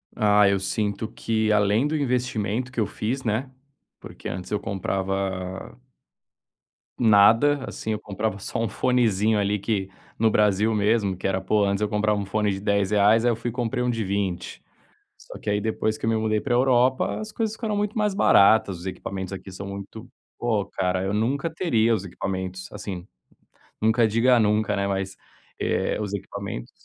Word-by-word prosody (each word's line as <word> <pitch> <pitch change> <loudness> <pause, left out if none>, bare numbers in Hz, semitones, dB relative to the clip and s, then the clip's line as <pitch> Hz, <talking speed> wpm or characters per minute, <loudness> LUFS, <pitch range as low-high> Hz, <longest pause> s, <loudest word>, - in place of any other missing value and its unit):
Ah, 105 -2 +4
eu 100 -1 +1
sinto 100 +2 -2
que, 110 -1 -1
além 105 +5 +3
do 155 - -2
investimento 125 -4 -1
que 130 - -4
eu 110 - +1
fiz, 130 +5 -3
né, 115 +4 -1 0.5
porque - - -9
antes 90 -1 -5
eu 105 - 0
comprava 95 0 -3 1.2
nada, 115 +6 +5
assim. 110 - -4
Eu 105 - -3
comprava 105 0 -3
só 105 - -4
um 115 - 0
fonezinho 110 -4 +2
ali, 100 +1 +1
que 100 -1 -2 0.3
no 110 - +4
Brasil 105 +1 +2
mesmo, 105 -2 +1
que 90 - -9
era 95 -1 0
pô, 105 +2 +1
antes 100 0 0
eu 105 - +2
comprava 105 0 +1
um 100 - -3
fone 105 +1 0
de 95 - -3
R$10, 100 +2 +3
aí 120 - +3
eu - - 0
fui 120 0 -3
comprei 125 +1 -2
um 125 - 0
de 115 -2 -1
R$20. 95 -2 -3 0.5
Só - - -12
que - - -9
aí 105 0 +1
depois 110 0 -1
que - - -10
eu - - +2
me 115 - +1
mudei 110 -1 0
pra 130 - -3
Europa, 130 +1 +2
as 215 0 -6
coisas 220 -2 -2
ficaram 225 -2 -3
muito 205 +1 -1
mais 210 -1 +1
baratas, 100 - +4
os 90 - -9
equipamentos 95 0 -5
aqui 95 0 -7
são 95 +1 -7
muito 100 +4 -8 0.3
poxa 110 -4 0
cara, 95 0 -1
eu 95 +1 -1
nunca 130 +9 0
teria 120 -9 +1
os 100 -3 -3
equipamentos, 95 0 -5
assim 95 -3 -6 0.8
nunca 110 +1 +3
diga 120 +3 +4
nunca, 105 -1 +2
né, 100 0 -1
mas, 95 -1 -2 0.4
eh, - - 0
os 105 -2 -4
equipamentos 75 -10 -6
105 Hz, 180 wpm, -24 LUFS, 100-115 Hz, 1.2 s, nada